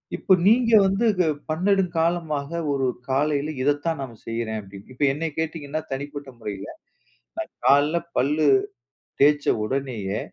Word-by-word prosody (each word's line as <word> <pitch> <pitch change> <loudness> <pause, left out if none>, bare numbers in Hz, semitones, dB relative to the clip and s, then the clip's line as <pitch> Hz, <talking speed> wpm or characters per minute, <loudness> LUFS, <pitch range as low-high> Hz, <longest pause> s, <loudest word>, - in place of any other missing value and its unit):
இப்ப 195 - +3
நீங்க 230 +2 +4
வந்து 195 +4 +1
கு 180 - +3 0.2
"பன்னெடுங்காலமாக 165 -4 0 0.2
ஒரு 135 -1 0 0.2
காலையில 145 +2 +1
இத 145 +3 +3
தான் 165 -4 -1
நான் 125 -4 -7
செய்றேன்." 115 -1 -3
அப்படீன்னு. 100 +3 -13
இப்ப 135 +3 -3
என்னைய 155 +3 -3
கேட்டீங்கன்னா 155 -1 -3
தனிப்பட்ட 145 +1 -5
முறையில, 105 -3 -6 0.8
நா - - -15 0.2
காலையில 145 +4 +4 0.2
பல்லு 150 +4 +2 0.8
தேய்ச்ச 145 0 +4 0.2
உடனேயே, 115 -5 -2
145 Hz, 130 wpm, -24 LUFS, 130-165 Hz, 0.8 s, நீங்க